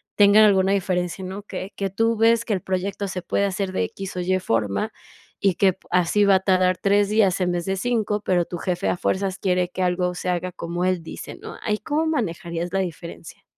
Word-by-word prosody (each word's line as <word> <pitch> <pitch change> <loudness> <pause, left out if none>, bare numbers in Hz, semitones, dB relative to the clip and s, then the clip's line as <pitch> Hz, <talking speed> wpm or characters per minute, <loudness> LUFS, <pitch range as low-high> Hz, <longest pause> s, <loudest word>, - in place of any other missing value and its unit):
tenga 205 +1 +7
alguna 190 -2 +4
diferencia, 185 -1 -1
¿no? 190 +2 -6
Que 195 -1 -7
que 195 -1 -2
tú 225 +4 +1
ves 230 +1 +3
que 225 - 0
el 190 - -1
proyecto 190 +2 -2
se 185 0 -4
puede 200 - 0
hacer 195 -1 -2
de - - 0
X 195 - -7
o - - -2
Y 185 +1 +1
forma, 115 - -1 0.5
y 195 -3 +2
que 190 -1 +3
p 190 - -29
así 180 +3 +3
va 200 -1 +5
a - - +4
tardar 185 -1 +2
3 200 0 +2
días 205 -4 +3
en 180 -1 +1
vez 175 -1 -2
de 195 - -1
5, 210 0 0
pero, 180 -4 +1
tu 175 - -6
jefe 175 +1 -2
a - - +1
fuerzas 190 +1 -1
quiere 180 -1 0
que 185 +1 -3
algo 180 0 0
se 180 - -3
haga 180 0 -1
como 175 +1 -3
él 185 -2 0
dice, - - -8
¿no? - - -9
¿Ahí 210 -1 0
cómo 300 +9 -1
manejarías 170 - -2
la 195 - 0
diferencia? 170 -3 -6
190 Hz, 225 wpm, -23 LUFS, 180-200 Hz, 0.5 s, tenga